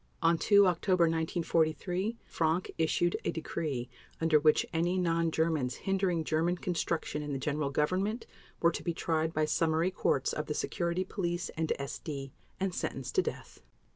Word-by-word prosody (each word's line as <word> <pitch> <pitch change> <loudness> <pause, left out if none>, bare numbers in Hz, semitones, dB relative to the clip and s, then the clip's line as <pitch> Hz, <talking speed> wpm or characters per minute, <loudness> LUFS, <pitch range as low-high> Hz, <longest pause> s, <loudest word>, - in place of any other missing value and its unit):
On 165 +1 +5
2 200 +4 +5
October 180 0 +2
1943 165 +5 0
Frank 165 +2 0
issued 170 +2 +2
a - - 0
decree 150 -6 -3 0.3
under 160 -2 +4
which 155 0 +4
any 175 +3 +1
non 165 -2 +2
Germans 160 -6 0
hindering 190 -4 0
German 165 +3 +1
construction 165 -4 -2
in 145 -1 -4
the - - -1
General 145 +1 -1
Government 185 - 0 0.4
were 170 - +5
to - - -5
be 170 -2 -2
tried 160 -1 0
by 155 -1 +1
summary 160 +3 +1
courts - - +1
of - - -3
the - - -2
Security 170 0 -1
Police 175 -2 -3
and 160 0 -2
SD 140 0 -5 0.3
and 190 -1 -1
sentenced 135 -6 -4
to - - +4
death. - - -6
165 Hz, 160 wpm, -31 LUFS, 155-180 Hz, 0.4 s, On